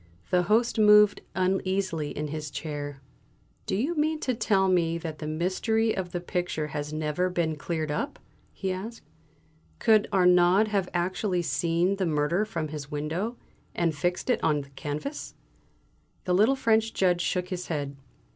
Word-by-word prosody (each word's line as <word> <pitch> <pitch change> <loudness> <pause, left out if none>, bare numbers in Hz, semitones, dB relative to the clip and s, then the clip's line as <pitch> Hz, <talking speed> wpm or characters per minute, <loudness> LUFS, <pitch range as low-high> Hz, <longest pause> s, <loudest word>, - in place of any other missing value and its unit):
The 180 - +4
Host 225 +5 +2
moved 210 -1 +6
uneasily 185 -4 0
in 150 0 -4
his 155 0 -4
chair. 145 -1 -5 0.7
"Do - - 0
you 265 - 0
mean 310 +1 +1
to 255 - 0
tell 210 -4 +2
me 170 -3 +2
that 160 -2 -6
the 150 - -5
mystery 190 +8 0
of 180 -2 -4
the 175 - -2
picture 175 -3 -2
has 145 +1 -4
never 155 +4 -1
been 170 -3 -1
cleared 155 0 -3
up?" 280 - -3 0.3
he 190 -2 -3
asked. 210 +5 -6 0.7
"Could 215 -2 +4
Arnaud 180 +2 +5
have 195 -3 0
actually 180 +1 0
seen 170 +6 +1
the 190 -2 0
murder 155 +6 +1
from 165 -8 -4
his 145 -2 -6
window, 165 +11 -3 0.4
and 170 -2 +1
fixed 175 - -1
it - - 0
on 150 -2 +2
the 140 - -13
canvas?" 150 - -5 0.9
The 180 - 0
little 215 +9 +4
French 225 -3 +1
Judge 180 -2 +2
shook 180 +1 -1
his 180 -2 -4
head. 145 -3 -3
180 Hz, 160 wpm, -27 LUFS, 155-205 Hz, 0.9 s, moved